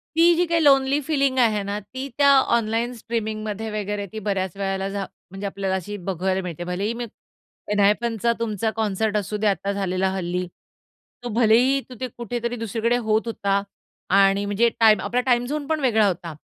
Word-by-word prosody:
ती, 340 +1 +6
जी 355 - +2
काही 335 -1 +1
lonely 275 0 +4
feeling 275 -3 0
आहे 220 -4 +3
ना, 200 +1 -3
ती 260 +7 -7
त्या 285 -1 +5 0.3
ऑनलाईन 230 +1 0
स्ट्रीमिंगमध्ये 220 -2 -4
वगैरे 205 -1 -3
ती 220 - -5
बऱ्याच 190 -2 -1
वेळेला 195 0 -2
झा 195 -1 -3 0.3
म्हणजे, 195 +1 -6
आपल्याला 195 -1 -2
अशी 190 +2 -5
बघायला 190 +1 -1
मिळते. 175 -1 -5
भलेही 190 +6 -2
मी 240 0 -4 0.7
एनहायपनचा 220 +3 +2
तुमचा 220 -1 -1
कॉन्सर्ट 215 0 0
असू 210 +1 -2
दे 210 +1 0
आता 200 0 0
झालेला 190 -1 0
हल्ली. 180 -1 -2 0.8
तो 245 - -4
भलेही 245 +4 +4
तू, 250 - -9
ते 255 - -1
कुठेतरी 235 +1 -3
2 225 -1 -4
कडे 235 +2 +2
होत 215 0 +3
होता 200 -3 0 0.6
आणि 195 +1 +3
म्हणजे 205 +4 +2
टाईम 220 -2 +6
आपला 250 +1 0
टाईम 245 -1 +2
झोन 290 +2 -3
पण 315 -1 0
वेगळा 220 -6 +3
होता. 170 -3 -3
215 Hz, 180 wpm, -23 LUFS, 195-240 Hz, 0.8 s, ती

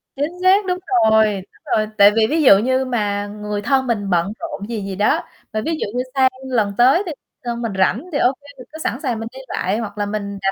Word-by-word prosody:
Chính 290 +4 -1
xác, 385 +2 +4
đúng 360 -1 -1 0.3
rồi, 220 0 +5
đúng 190 - -6 0.3
rồi, 215 -1 +1
tại 200 +1 +8
vì 220 -1 +3
ví 315 +1 +1
dụ 200 -7 +8
như 260 +4 +1
mà 205 -4 -1
người 210 0 -5
thân 265 +2 +1
mình 205 -4 -1
bận 180 +3 +1
rộn 205 +4 -6
gì 220 -3 -3
gì 195 -1 -5
đó, 205 +2 +1 0.3
và 215 - -1
ví 325 - -1
dụ - - -2
như 250 - +1
sang 260 -1 +5 0.2
lần 215 -6 0
tới 265 +11 +5
thì 335 - -4 0.3
thân 235 0 -3
mình 230 -3 -2
rảnh 195 - +1
thì - - +1
ô 255 0 +3
kê 285 - -18
mình 250 - -11
cứ 315 - -8
sẵn 255 - -2
sàng 240 -4 -1
mình 225 - -5
đi 265 - -9
lại, 190 +4 -1
hoặc 210 -2 -5
là 205 - -1
mình 200 -1 -4
220 Hz, 250 wpm, -20 LUFS, 205-260 Hz, 0.3 s, tại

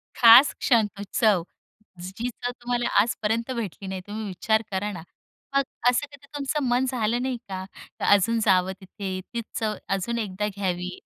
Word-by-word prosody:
खास 240 +4 +8
क्षण 230 -4 +3
तो 200 - -6
चव, 210 -7 +3 0.6
जी 195 +7 -4
चव 245 +1 -4
तुम्हाला 240 0 -1
आजपर्यंत 230 +2 -1
भेटली 205 -4 -5
नाही. 190 -1 -4
तुम्ही 215 +1 -5
विचार 220 +4 +1
करा 205 +2 -1
ना. 170 -4 -8 0.5
मग 275 - +4 0.3
असं 250 +4 +1
कधी 280 0 -15
तुमचं 290 +1 -1
मन 245 +2 +2
झालं 240 -1 0
नाही 255 -1 -1
का, 185 0 -4 0.3
का - - -1
अजून 225 +4 +3
जावं 185 -1 +3
तिथे? 190 0 -5
तीच 235 0 -2 0.2
चव 215 -1 -1
अजून 195 +5 -1
एकदा 210 -1 -2
घ्यावी? 180 -2 -3
220 Hz, 165 wpm, -25 LUFS, 190-240 Hz, 0.6 s, खास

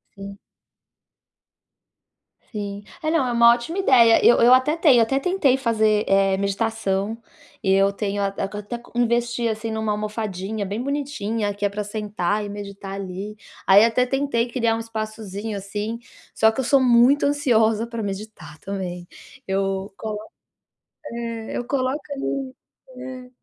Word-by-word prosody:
Sim. 200 0 -9 2.1
Sim. 205 -2 -5 0.2
É. 310 - -1
Não, 320 -4 +2
é - - -1
uma 235 0 +6
ótima 245 +10 -4
ideia. 240 -10 +5
Eu 240 - +7
eu 240 +2 +7
até 260 +5 +3
tenho 280 -8 +5
até 270 +4 +1
tentei 285 -5 +2
fazer, 220 -4 +2
eh, 195 0 +3
meditação. 200 +1 -1 0.5
Eu 195 +1 +3
tenho 200 0 -3
a 200 0 0
co 200 +1 -4
até 210 +4 -5
co 235 - -17
até 240 - -3
investi, 235 0 +1
assim, 220 0 -3
numa 220 -1 -1
almofadinha 210 -1 -4
bem 205 +4 -3
bonitinha, 230 -7 -2
que 205 0 -3
é - - +2
pra 205 +1 -4
sentar 210 -1 -2
e - - -6
meditar 200 -1 -7
ali. 195 +2 -6 0.3
Aí 200 +2 +7
até 240 +2 +2
tentei 270 -2 0
criar 230 -2 +1
um - - -4
espaçozinho, 215 -2 -5
assim, 205 +3 -4 0.4
só 220 0 +4
que 225 - -7
eu - - +1
sou 275 +2 +4
muito 250 +3 +5
ansiosa 230 -6 +2
pra 230 -1 -5
meditar 195 -7 -7
também. 180 -2 -5 0.4
Eu 195 0 -2
colo 215 -1 -4 0.9
é, 230 -1 -5
eu 245 - -3
coloco 265 +2 -1
ali 270 -1 -3 0.4
é. 255 0 -8
220 Hz, 155 wpm, -23 LUFS, 200-240 Hz, 2.1 s, Eu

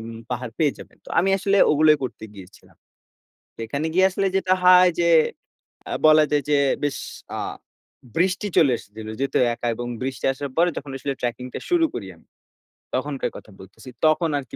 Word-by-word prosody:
উ - - -8 0.3
পাহাড় 125 -1 -4
পেয়ে 150 -4 +2
যাবেন। - - -13
তো - - -13
আমি 195 +2 +3
আসলে 200 +1 +1
ওগুলোই 155 0 +5
করতে 125 -3 -5
গিয়েছিলাম। 95 -1 -15 0.8
সেখানে 130 +7 -3
গিয়ে 190 +1 +5
আসলে 195 +1 -1
যেটা 190 -1 +1
হয়, 180 0 +7
যে 170 - +2 0.8
আ - - -5
বলা 155 0 +7
যায় 145 -1 +2
যে 145 - +4 0.3
বেশ 145 -1 -1 0.4
আ - - -3 0.8
বৃষ্টি 185 +4 +1
চলে 140 -5 +5
এসেছিল। 110 +1 -11
যেহেতু 135 -1 0 0.2
একা, 120 - -4
এবং 120 +1 -5
বৃষ্টি 130 -1 -4
আসার 140 +1 -6
পরে 175 +1 +4
যখন 140 -1 -6
আসলে 140 +1 -3
ট্র্যাকিং 125 +1 -3
টা - - -4
শুরু 345 -2 +3
করি 100 -4 -5
আমি। - - -25 0.7
তখনকার 135 +1 -2
কথা 105 - -14
বলতেছি। 95 +7 -13 0.2
তখন 155 +1 +3
আরকি 130 -4 -7
145 Hz, 175 wpm, -23 LUFS, 125-175 Hz, 0.8 s, হয়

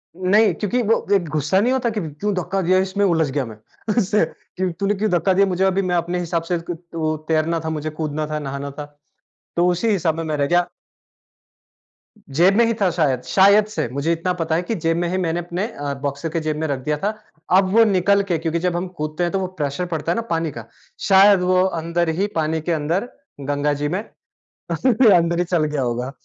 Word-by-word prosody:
नहीं, 190 +2 +3
क्योंकि 220 +7 -1
वो 225 +2 +1
एक 175 -4 0
गुस्सा 155 +5 +1
नहीं 245 +5 +2
होता 250 -3 0
कि 215 -2 -3
क्यों 165 +7 -3
धक्का 185 +2 -1
दिया, 185 +1 +3
इसमें 190 +2 0
उलझ 160 -5 +2
गया, 135 -1 -1
"मैं 110 -2 -10 0.4
उससे 210 -1 +3
कि 185 -1 -5
तूने 200 +1 +1
क्यों 215 +2 0
धक्का 180 +2 +2
दिया 200 +1 +4
मुझे? 185 0 0
अभी 190 +1 +2
मैं 180 -1 -1
अपने 175 +1 -1
हिसाब 170 -1 -2
से 175 - +2
क 175 - -3 0.2
त 155 -1 -2
तैरना 160 +1 +1
था, - - -1
मुझे 155 -1 -3
कूदना 155 -1 -3
था, 155 0 -3
नहाना 140 0 -5
था, 145 - -4 0.7
तो 175 +1 +3
उसी 180 +6 0
हिसाब 170 -5 +1
में, 165 - -3
मैं 155 -1 -2
रह 140 -1 +1
गया।" 175 +2 +2 1.7
जेब 180 +4 +5
में 235 - +5
ही 230 - +1
था 190 - +4
शायद, 140 -7 +1
शायद 200 +9 +5
से, 215 - -3
मुझे 145 +4 0
इतना 180 +2 -1
पता 160 0 0
है 170 - +1
कि 225 - -2
जेब 165 -2 0
में 175 0 0
ही 185 - -1
मैंने 175 -2 -1
अपने 175 +5 -3
अ, 145 -9 -5
बॉक्सर 140 +3 -3
के 165 +1 -2
जेब 155 -1 -2
में 160 0 -2
रख 140 -2 -2
दिया 150 0 0
था। 210 +2 +1 0.4
अब 190 -1 +2
वो 230 - +7
निकल 200 0 +3
के 175 -4 -1
क्योंकि 165 +1 -2
जब 180 0 -1
हम 180 +2 -2
कूदते 155 +3 -3
हैं 175 - 0
तो 195 - +1
वो 185 - -2
प्रेशर 145 +5 -2
पड़ता 160 +1 -1
है - - +1
ना 230 - -1
पानी 165 -2 -1
का, 115 -3 -9 0.4
शायद 195 0 +6
वो 185 0 +3 0.2
अंदर 170 0 0
ही 200 - +2
पानी 160 0 0
के 170 - -2
अंदर 165 +9 -1 0.3
गंगा 145 +1 0
जी 145 - +1
में 185 +4 -1 0.7
अंदर 205 -9 +3
ही 175 - +2
चल 170 -3 +1
गया 150 -3 -2
होगा। 125 +2 -2
170 Hz, 230 wpm, -21 LUFS, 155-190 Hz, 1.7 s, वो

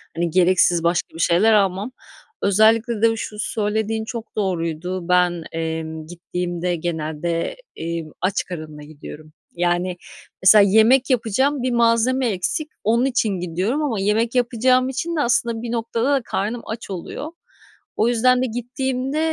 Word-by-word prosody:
hani, 170 0 0
gereksiz 175 -1 +3
başka 170 0 0
bir - - -9
şeyler 180 +7 +4
almam. 200 +2 +1 0.5
Özellikle 220 +3 +3
de 225 0 +4
şu 215 -1 -6
söylediğin 220 +1 -1
çok 230 0 -7
doğruydu. 180 -2 -2
Ben, 180 -2 +2
emm, 160 -1 -4
gittiğimde 175 +1 -3
genelde, 165 - -3 0.2
eee, 165 0 -4 0.2
aç 185 +1 0
karınla 155 -4 -8
gidiyorum. 155 +1 -12 0.2
Yani, 175 +1 0 0.5
mesela 205 +3 +8
yemek 220 +7 +4
yapacağım, 255 +3 +1
1 255 - 0
malzeme 235 +2 +2
eksik. 210 - -2
Onun 235 +4 +2
için 245 -4 +1
gidiyorum 185 - -1
ama 235 -9 -1
yemek 225 +5 0
yapacağım 255 +1 +2
için 330 +6 -3
de 300 - +1
aslında 235 -2 0
bir 240 -1 -5
noktada 235 +3 -1
da 275 - +2
karnım 220 +5 -2
aç 225 0 -7
oluyor. 195 - -6 0.7
O 220 - +3
yüzden 250 +2 +3
de - - +1
gittiğimde, 255 +4 -3
210 Hz, 145 wpm, -21 LUFS, 175-240 Hz, 0.7 s, mesela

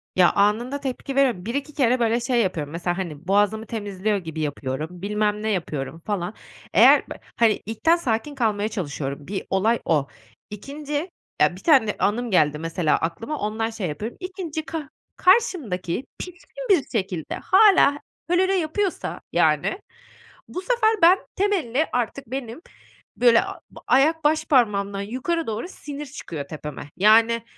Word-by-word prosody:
Ya, 180 -1 +5
anında 225 +7 +1
tepki 270 0 -5
veriyo 250 -10 +2
1-2 280 +6 -3
kere 255 -3 +2
böyle 230 0 +2
şey 240 0 +1
yapıyorum, 160 -8 -2
mesela, 175 +1 -2
hani, 170 -3 -6
boğazımı 205 +3 +2
temizliyor 205 -2 -2
gibi 165 -4 -6
yapıyorum, 150 +4 -4
bilmem 210 +1 -1
ne 220 - 0
yapıyorum, 165 -6 -3
falan. 200 -2 -2 0.4
Eğer - - +7
b - - -4 0.2
hani, 230 -2 +3
ilkten 225 - +2
sakin 285 -3 -2
kalmaya 215 -4 0
çalışıyorum, 145 -8 -5
bir 195 0 -3
olay 220 +5 +2
o. 150 -4 +1 0.4
2'nci 290 - -5 0.3
ya, - - +4
bir - - -13
tane 265 - +4
anım 230 +3 0
geldi 150 -5 +3
mesela 165 -1 0
aklıma, 225 - -3
ondan 220 +2 -2
şey 220 -5 -4
yapıyorum. 210 +10 -5
2'nci 365 -4 -5
ka 315 -4 -5 0.3
karşımdaki 270 - +1
pişkin 370 +8 -9
bir 355 -9 +4
şekilde 190 - -3
hâlâ 380 -8 +5 0.3
hölölö 375 +2 +3
yapıyorsa, 370 +2 -2
yani, - - +2 0.7
bu 365 - -5
sefer 465 +1 +2
ben, 350 +3 +7 0.2
temelli 330 - +1
artık 245 +2 -2
benim, 250 +2 -6 0.6
böyle, 235 -1 +5
a - - -7 0.3
ayak 310 +5 +3
başparmağımdan 210 -10 +2
yukarı 260 +11 -2
doğru 225 +7 -3
sinir 295 -5 -8
çıkıyor 165 - -7
tepeme. 150 -2 -8
Yani, 220 +4 +6
b 230 - +1
b - - -23
225 Hz, 150 wpm, -23 LUFS, 190-295 Hz, 0.7 s, Eğer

